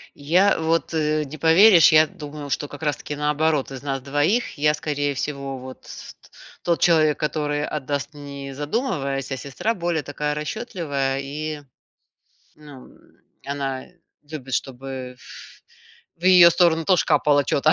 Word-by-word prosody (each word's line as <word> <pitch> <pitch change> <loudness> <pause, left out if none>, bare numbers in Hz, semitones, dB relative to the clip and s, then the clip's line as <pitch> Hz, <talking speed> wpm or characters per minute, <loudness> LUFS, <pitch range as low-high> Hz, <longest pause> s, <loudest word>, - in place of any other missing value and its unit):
Я, 180 +8 +2
вот, 165 +1 0
э, 155 -1 0
не 145 +2 -9
поверишь, 170 +3 +6
я 155 0 +6
думаю, 150 -1 -9
что 145 +2 -2
как 145 +2 -11
раз 150 -3 0
таки 145 - -7
наоборот, 150 -1 0
из 135 -2 -8
нас 135 -1 -3
двоих, 145 - 0
я, 150 +1 +3
скорее 145 -1 -2
всего, 140 -1 -4
вот 130 0 -10
т - - -18 0.7
тот 170 -1 0
человек, 155 -3 +3
который 150 -1 -1
отдаст, 145 0 -4
не 140 -1 -8
задумываясь, 145 - -2
а - - -2
сестра 140 - -3
более 170 -4 -2
такая 150 +1 -3
расчетливая 150 - -3
и 150 +2 -5 0.9
ну, 145 -4 -14 0.5
она 135 -2 -4 0.5
любит, 135 -4 -7
чтобы 130 0 -4
ф - - -28 1.0
в 170 - -13
ее 180 -2 +8
сторону 170 -1 +3
тож 185 +1 +3
капало 145 -2 +3
чё-то. 155 +4 +2
150 Hz, 145 wpm, -22 LUFS, 140-160 Hz, 1.0 s, ее